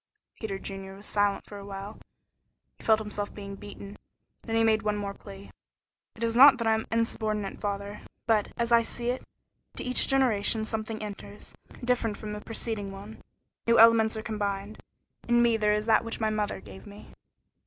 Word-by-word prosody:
Peter 205 -4 -3
Junior 195 0 -7
was 200 +1 -11
silent 205 -1 +1
for 205 - -9
a - - -9
while; 200 +1 -7 0.8
he - - -14
felt 220 -1 +5
himself 210 -1 -4
being 200 -1 -7
beaten. 200 0 -10 0.4
Then 225 - -3
he 225 - +4
made 220 -1 +3
one 210 0 0
more 200 -1 -3
plea. 200 -1 -12 0.6
"It 230 - -6
is 230 0 0
not 275 +2 +9
that 230 - -3
I 225 - +4
am 220 0 -1
insubordinate 215 -3 -1
father, 200 0 -4 0.2
but, 220 -3 +2
as 235 0 -1
I 235 0 +7
see 240 +1 -2
it, 255 - -4 0.5
into - - -5
each 250 - +3
generation 225 -5 +3
something 220 0 -4
enters, 205 0 -9 0.3
different 235 -4 0
from 210 -1 -6
the 210 - -6
preceding 220 -3 -3
one. 200 +3 -10 0.5
New 230 - +5
elements 225 -1 +6
are 220 - -5
combined. 205 -1 -3 0.5
In 240 0 +4
me 235 -1 +4
there 210 -1 +2
is 210 0 0
that 225 0 +4
which 230 - -4
my 220 -1 +1
mother 210 - -1
gave 95 -1 -12
me." 205 +1 -12
215 Hz, 185 wpm, -28 LUFS, 200-225 Hz, 0.8 s, not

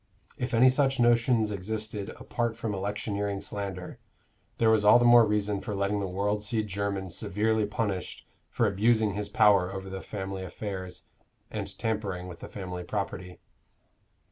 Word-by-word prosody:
If 125 -1 -2
any 125 +3 +7
such 135 0 +2
notions 120 -2 +3
existed 105 +1 -4
apart 120 -2 -2
from 115 -2 -3
electioneering 100 0 -2
slander, 95 -3 -6 0.6
there 115 -1 +4
was 110 -2 +3
all 105 +3 +8
the 120 - +3
more 120 -2 +7
reason 105 -1 0
for 105 - -4
letting 100 +1 0
the 100 - -2
world 100 +3 -1
see 110 +1 0
Jermyn 100 -2 -3
severely 105 +3 0
punished 100 -3 -3 0.2
for 115 - +1
abusing 110 +1 +2
his 105 0 -4
power 105 -5 +4
over 95 0 -6
the 95 0 -5
family 95 -2 -5
affairs, 95 0 -6 0.5
and - - -5
tampering 100 -5 -2
with 85 -2 -9
the - - -9
family 90 -2 -6
property. 90 -2 -5
105 Hz, 155 wpm, -28 LUFS, 95-110 Hz, 0.6 s, all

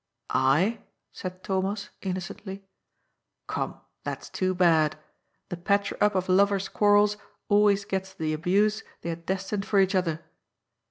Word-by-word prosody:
" - - -53 0.3
I? 205 +8 +1
" - - -53
said 185 0 -7
Thomas 195 +2 -1
innocently. 190 +1 -5 0.8
Come, - - -3 0.2
that's - - -5
too 185 0 0
bad. 160 -4 +3 0.5
The 175 - -4
patcher 200 +3 +1
up 210 -1 +4
of 185 0 0
lovers' 195 +1 +3
quarrels 205 0 +4 0.3
always 205 -1 +4
gets 190 -1 -3
the 155 -4 -2
abuse 200 +7 +2 0.2
they 170 - -4
had 165 0 -6
destined 195 +2 -2
for 200 - +3
each 190 0 +3
other. 170 -4 0
190 Hz, 145 wpm, -27 LUFS, 180-205 Hz, 0.8 s, up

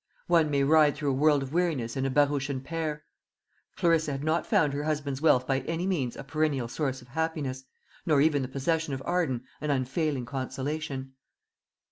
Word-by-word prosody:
One 165 -3 +3
may 140 -1 +2
ride 150 0 +5
through 145 -2 -1
a - - 0
world 145 +1 +3
of 135 +2 -7
weariness 160 -10 0
in 135 0 0
a - - -1
barouche 145 0 +2
and 130 -2 -3
pair. 155 -2 -3 0.7
Clarissa 165 -3 +2
had 135 +1 -4
not 160 +2 0
found 145 -3 +3
her 145 +1 -2
husband's 145 -3 -2
wealth 130 -6 +4
by 135 0 +1
any 165 +6 -3
means 150 -11 -1
a - - -7
perennial 140 -3 0
source 130 0 -3
of 125 - -20
happiness, 145 -3 -3 0.4
nor 150 -4 +3
even 145 -1 +3
the 130 - -2
possession 145 +2 -1
of 135 - -7
Arden 160 -9 0 0.2
an 150 - -2
unfailing 135 0 0
consolation. 135 +1 -4
145 Hz, 185 wpm, -28 LUFS, 135-155 Hz, 0.7 s, ride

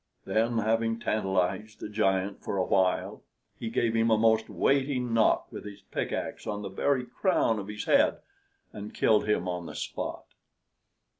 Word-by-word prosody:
Then 115 +2 +1
having 115 +1 +1
tantalized 105 0 -1
the - - -5
giant 100 -2 0
for 100 - -3
a 90 - +1
while, 95 -1 +1 0.4
he 115 - -3
gave 115 0 +1
him 115 0 +3
a 110 - +4
most 110 0 +3
weighty 135 -1 +1
knock 115 -3 +2
with - - -7
his 100 -1 -10
pickaxe - - -3
on 105 -1 -3
the 100 - -4
very 125 +6 0
crown 125 - +1
of 100 - -6
his 105 0 -5
head, - - +4 0.6
and 105 0 -8
killed 105 -1 +3
him 90 -4 +1
on 90 -1 -3
the - - -8
spot. - - -5
110 Hz, 165 wpm, -28 LUFS, 100-115 Hz, 0.6 s, a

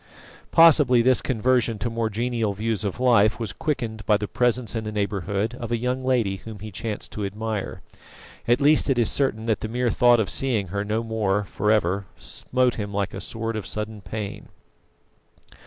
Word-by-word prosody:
Possibly 150 -7 +6
this 130 +1 +4
conversion 120 -2 +1
to 110 - -3
more 115 -1 -1
genial 115 -1 -1
views 110 +1 -2
of 100 +1 -3
life 115 -5 +4
was 110 -4 -3
quickened 115 -8 -3
by 105 - +4
the 105 0 -4
presence 120 -1 0
in 110 - -2
the 110 - -4
neighbourhood 100 +1 -2
of 120 -2 -7
a 120 - +1
young 125 +2 -2
lady 120 -7 +1
whom 110 +2 -10
he 105 +2 -8
chanced 105 +1 -5
to 105 - -5
admire; 105 +1 -4 0.6
at 120 +1 +3
least 150 +1 +4
it 135 - +2
is 120 -3 +3
certain 115 -6 +1
that 110 -3 0
the - - -4
mere 120 +1 0
thought 120 +2 +4
of 110 - +1
seeing 115 -9 0
her 100 +2 -2
no 110 +2 -1
more 105 -3 0
for 105 +1 -2
ever 100 -2 +1
smote 125 -1 -1
him 105 0 -5
like 100 -1 -2
a - - -5
sword 115 0 -4
of 105 -3 -4
sudden 105 0 -4
pain. 100 +2 -6
110 Hz, 190 wpm, -24 LUFS, 105-120 Hz, 0.6 s, Possibly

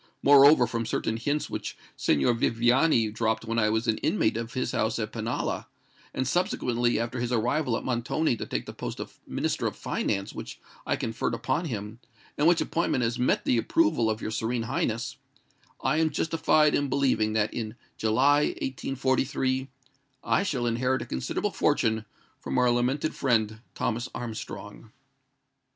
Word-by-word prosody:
Moreover, 140 -1 +7
from 115 -1 -3
certain 110 - -1
hints 145 +6 -1
which - - -5 0.2
Signor 75 - +2
Viviani 120 +1 +3
dropped 110 0 -1
when 115 0 0
I 105 -1 +3
was 110 +2 0
an 110 - +1
inmate 110 +1 +1
of 115 0 -4
his 130 - -1
house - - 0
at - - -3
Pinalla—and 130 - -4
subsequently, 120 -7 +1
after 115 +2 -3
his 120 0 -2
arrival 125 +2 +1
at - - -6
Montoni 125 +3 0
to - - -5
take - - -3
the - - -8
post - - -6
of - - -8
Minister - - -1
of - - -4
Finance 100 0 -2
which - - -8 0.3
I - - +2
conferred 115 0 -2
upon 130 +8 -1
him, 110 -4 -5 0.4
and 150 - +2
which 170 -1 +4
appointment 165 -6 0
has 115 +1 -1
met 125 - +1
the 120 - +3
approval 310 - +2
of 110 0 -2
your 110 - -2
Serene 115 +2 -1
Highness—I 115 +5 -4
am 160 0 +3
justified 155 -2 +2
in 145 -1 +1
believing 130 -6 +1
that 110 -1 +1
in 110 -1 -4 0.2
July, 135 +7 +3
1843, 130 0 -1 0.5
I - - +2
shall 135 -11 -1
inherit 125 +3 0
a - - -9
considerable 65 - -2
fortune 110 -1 +1 0.3
from - - -3
our 125 -1 +4
lamented 130 +6 0
friend 110 -4 0
Thomas 120 +2 -2
Armstrong." 115 -2 -7
120 Hz, 160 wpm, -27 LUFS, 115-135 Hz, 0.5 s, Moreover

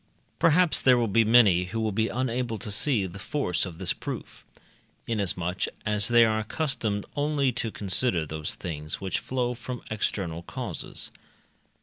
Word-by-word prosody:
Perhaps 165 +1 +4
there 130 -1 +5
will 120 -1 +1
be 115 +3 +4
many 105 -6 +5
who 115 +5 -4
will 110 -1 0
be 110 +2 +1
unable 125 -2 -2
to 105 +1 -2
see 105 0 +3
the 95 +1 -8
force 100 - -1
of 85 -3 -9
this 90 -2 +1
proof, - - -7 0.6
inasmuch 90 -5 -1 0.2
as 105 0 +2
they 120 -1 +6
are 110 -1 +1
accustomed 110 -4 -2
only 145 -2 +1
to 115 -1 -2
consider 95 -3 +1
those 75 0 -4
things 75 -4 -5
which 95 -1 -2
flow 125 -1 -1
from 125 +1 -7
external 95 -6 -2
causes. - - -5
110 Hz, 155 wpm, -27 LUFS, 95-125 Hz, 0.6 s, they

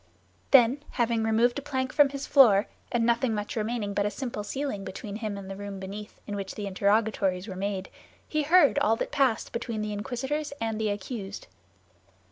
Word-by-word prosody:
Then, 260 +1 +6
having 235 -2 +1
removed 230 +4 +2
a - - -8
plank 260 -2 -2
from 290 -2 +5
his 275 0 -5
floor, 220 -8 +6 0.3
and 235 -1 +2
nothing 235 0 +2 0.2
remaining 215 -2 -2
but 200 0 +1
a 205 - +1
simple 235 -2 -5
ceiling 265 -3 -3
between 200 +2 -6
him 215 -3 -4
and 195 -1 -8
the 195 - -6
room 200 0 -6
beneath, 200 +2 -8
in 205 - -4
which 195 -1 -5
the 205 - -4
interrogatories 200 -1 +1
were 190 - -6
made, 195 0 -3 0.4
he 305 - 0
heard 300 - +5
all 220 +2 +3
that - - -4
passed 270 -6 +1
between 230 -2 -3
the 210 0 -3
inquisitors 265 +7 -3
and 225 -1 -2
the 215 - +1
accused. 205 0 -5
220 Hz, 185 wpm, -27 LUFS, 205-260 Hz, 0.4 s, Then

